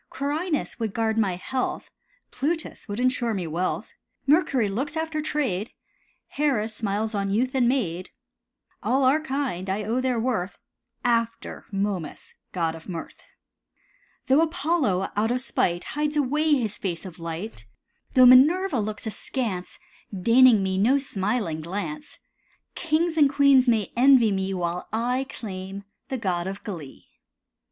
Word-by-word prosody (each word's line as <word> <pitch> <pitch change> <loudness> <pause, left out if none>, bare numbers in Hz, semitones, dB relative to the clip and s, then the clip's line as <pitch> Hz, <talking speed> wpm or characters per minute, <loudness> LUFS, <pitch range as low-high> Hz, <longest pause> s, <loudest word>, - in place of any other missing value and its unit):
Quirinus 300 +3 -2
would 220 -3 -3
guard 225 -1 +1
my 205 -5 +1
health, 255 +8 -3 0.4
Plutus 320 +4 -3
would 205 +1 -4
insure 245 -3 +1
me 185 -3 -3
wealth; 170 +3 -3 0.3
Mercury 280 - +3
looks 270 +10 -3
after 320 -1 -2
trade, 250 -10 -2 0.6
Hera 275 -7 0
smiles 215 0 -2
on 200 -1 -1
youth 245 +6 0
and 250 -3 +3
maid. 185 -9 -1 0.7
All 265 +2 +1
are 270 +4 +4
kind, 265 - -3
I 200 +3 -1
own 230 +5 0
their 255 -2 0
worth, 220 -6 -2 0.5
After 230 -1 -1
Momus, 195 -5 -3 0.2
god 165 -3 -1
of 165 +3 -11
mirth. 170 -3 -7 1.0
Though 270 +4 +4
Apollo, 300 - 0
out 215 +2 +1
of 250 +1 0
spite, 175 -8 -1
Hides 300 0 -2
away 300 +3 +1
his 225 -6 -2
face 180 -1 -3
of 180 -2 -10
light, 165 - -6 0.5
Though 255 -1 +8
Minerva 290 +5 +6
looks 210 +1 -4
askance, 220 -4 -4 0.3
Deigning 230 +2 +5
me 190 0 0
no 245 +8 +4
smiling 195 - -2
glance, 205 - -5 0.6
Kings 325 0 0
and 285 -2 +6
queens 280 -2 +5
may 220 -4 +1
envy 250 -3 +6
me 190 0 -1
While 175 0 -3
I 250 +4 -1
claim 195 -2 -7 0.3
the 265 - -2
god 185 -6 -1
of 195 +1 -6
glee. 165 -10 -8
230 Hz, 140 wpm, -25 LUFS, 195-270 Hz, 1.0 s, Though